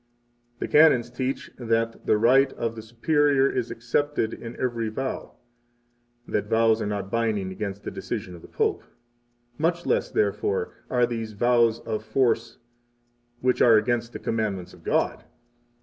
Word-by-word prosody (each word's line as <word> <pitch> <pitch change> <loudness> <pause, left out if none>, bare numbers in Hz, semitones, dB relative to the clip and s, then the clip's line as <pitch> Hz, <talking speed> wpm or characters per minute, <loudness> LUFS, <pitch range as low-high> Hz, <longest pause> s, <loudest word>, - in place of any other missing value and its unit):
The - - -3
Canons 140 -6 +5
teach 130 +2 -3
that 115 -1 -1
the 105 - +4
right 130 +5 +4
of 115 -1 -3
the 110 - -7
superior 135 +5 +2
is 125 -3 -2
excepted 120 0 -1
in 115 0 -8
every 115 -3 -1
vow; 130 +5 -5 0.9
[that 105 0 -1
vows 115 0 +3
are - - -1
not 100 -1 -4
binding 110 -5 0
against 100 0 -5
the - - -5
decision 90 - -5
of 85 - -11
the - - -13
Pope;] - - -1 0.8
much 170 +2 0
less, - - +1
therefore, 425 +2 0 0.2
are 125 -1 +3
these 115 -2 -4
vows 120 +1 +3
of 110 -1 -4
force 115 0 0 0.8
which 125 0 +1
are 115 -2 +7
against 115 +2 0
the - - -6
commandments 105 -5 -3
of - - -17
God. - - 0
115 Hz, 150 wpm, -25 LUFS, 110-130 Hz, 0.9 s, are